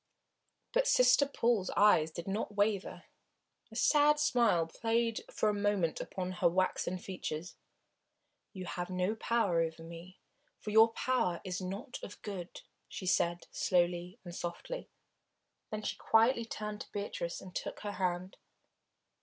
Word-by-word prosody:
But - - +3
Sister 250 - +5
Paul's 230 -8 +1
eyes 200 -7 +5
did 165 +2 -7
not 205 +1 -2
waver. 205 -1 0 0.7
A - - -11
sad 295 0 +4
smile 235 - +3
played 230 +5 0
for - - 0
a 210 - +3
moment 205 -5 0
upon 185 -1 -4
her 180 -1 +2
waxen 185 0 0
features. 180 -2 -5 1.0
"You 185 -1 -7
have 175 0 -4
no 185 +2 0
power 220 -6 +1
over 165 0 -3
me 170 +3 -11 0.4
for 210 - -6
your 220 +1 +7
power 225 -11 0
is 185 0 -4
not 200 +8 -5
of 205 - -9
good," 190 -4 -6 0.3
she 190 - -7
said, 175 -1 +1
slowly 175 +1 +1
and 175 - -7
softly. 175 - -5 0.8
Then 215 0 -4
she - - -2
quietly 230 +1 +3
turned 210 -2 -5
to - - -10
Beatrice, 200 -4 -4
and 185 - -11
took - - -5
her 205 - -3
hand. 185 -1 -2
195 Hz, 145 wpm, -33 LUFS, 175-225 Hz, 1.0 s, your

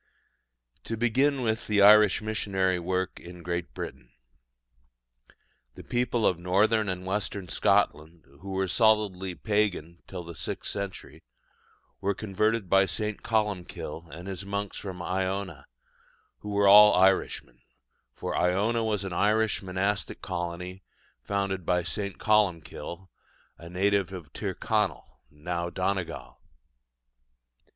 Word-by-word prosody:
To 115 - -3
begin 130 +4 +2
with 110 0 -1
the 105 -2 +4
Irish 105 0 +7
missionary 95 -4 0
work 90 +2 -2
in 85 0 -11
Great 85 0 -3
Britain. - - -7 1.7
The - - -10
people 120 -2 0
of 90 - +2
Northern 105 +4 +2
and 90 0 -4
Western 95 -1 -3
Scotland, 80 0 +1 0.2
who 100 - -8
were 95 0 -1
solidly 100 -3 +2
pagan 100 -6 -1
till 90 -2 -6
the 85 0 -9
sixth - - -4
century, 100 -2 -6 0.8
were 100 0 0
converted 110 +1 0
by 95 +2 +4
St. 105 +4 -3
Columkille 100 -6 -2
and 85 +3 -9
his 95 0 -5
monks 100 0 -4
from 90 -3 -6
Iona, 95 -4 -3 0.7
who 105 - -8
were 100 0 +3
all 105 +1 +9
Irishmen; 95 +1 +2 0.5
for - - -4
Iona 105 +6 +1
was 105 -3 -1
an 95 -2 -5
Irish 110 +4 +2
monastic 95 +2 -2
colony 90 +1 -5 0.4
founded 100 -2 -2
by 90 +1 +1
St. 100 +3 -4
Columkille, 95 -3 0 0.5
a 85 - -10
native 95 +1 +1
of 85 -6 -9
Tirconnell, 100 -2 -2
now 85 +3 -4
Donegal. 95 0 -3
95 Hz, 120 wpm, -28 LUFS, 90-105 Hz, 1.7 s, all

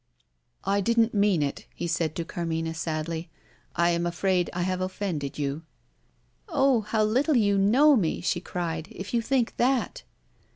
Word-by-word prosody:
"I 200 +1 +1
didn't 230 +2 +2
mean 200 -6 +3
it," 140 - -4
he - - -4
said 165 -2 -1
to 170 - -3
Carmina 165 -1 -3
sadly; 160 0 -3 0.5
"I 170 0 +3
am 170 0 0
afraid 180 +1 0
I 175 - -2
have 185 0 -1
offended 185 -7 -3
you." 145 +1 -2 0.9
"Oh, 270 -7 +3
how 215 +1 0
little 255 +7 +2
you 205 -3 +3
know 250 +10 +5
me," 175 -10 0
she 175 - -1
cried, 165 -3 -4
"if 190 +4 -8
you 235 - +2
think 250 0 0
that!" 255 +1 +1
185 Hz, 160 wpm, -26 LUFS, 165-225 Hz, 0.9 s, know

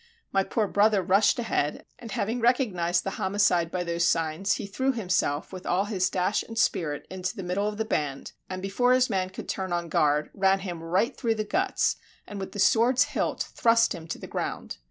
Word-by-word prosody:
My 195 - +2
poor 215 +1 -1
brother 205 -1 +3
rushed 195 +4 +3
ahead, 225 -11 -1
and 230 -3 -9
having 225 +6 -1
recognized 215 -9 +2
the 195 - -3
homicide 190 -4 +2
by 180 +1 -2
those 170 0 -1
signs, 165 +3 +1
he - - -4
threw 260 +7 -1
himself 185 - -1
with 185 -1 -7
all 185 +3 +1
his 190 -3 0
dash 185 +2 0
and 225 - -9
spirit 155 -9 0
into 185 +3 -4
the 195 - -6
middle 185 +4 -1
of 210 0 -4
the 220 - -1
band, 145 -10 -2 0.2
and 185 0 -5
before 245 +6 +2
his 255 -1 +3
man 185 -1 0
could 190 - -9
turn 190 -2 -3
on 170 -1 -2
guard, 150 0 +1
ran 195 0 +2
him 175 -4 -5
right 185 - 0
through 230 -3 0
the 215 - -1
guts, 380 - 0 0.3
and 205 - -7
with 190 - -6
the - - -7
sword's 235 +5 +4
hilt - - -2
thrust 230 -1 +3
him 165 -1 -9
to 165 - -4
the - - -9
ground. - - -5
195 Hz, 210 wpm, -27 LUFS, 175-220 Hz, 0.3 s, sword's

